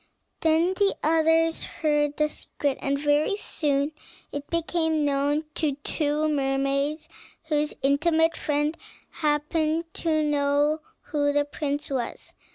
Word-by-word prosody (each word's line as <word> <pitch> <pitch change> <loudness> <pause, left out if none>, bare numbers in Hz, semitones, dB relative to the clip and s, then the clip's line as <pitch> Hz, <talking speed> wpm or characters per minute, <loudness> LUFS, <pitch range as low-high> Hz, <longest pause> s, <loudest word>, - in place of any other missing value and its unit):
Then 330 +3 +3
the 395 +1 +2
others 325 +1 +3
heard 295 -2 0
the 300 - +3
secret, 285 -2 -3
and 280 0 0
very 295 +6 +2
soon 290 -6 0 0.4
it 285 0 -6
became 320 -2 0
known 285 +2 +1
to 300 -4 0
two 300 0 0
mermaids 275 +1 0 0.4
whose 300 -2 0
intimate 320 +4 +3
friend 295 +1 0 0.4
happened 310 +2 0
to 315 -2 0
know 290 +1 +2 0.2
who 290 -1 0
the 290 0 +2
prince 290 0 -3
was. 250 -3 -4
300 Hz, 120 wpm, -26 LUFS, 285-320 Hz, 0.4 s, Then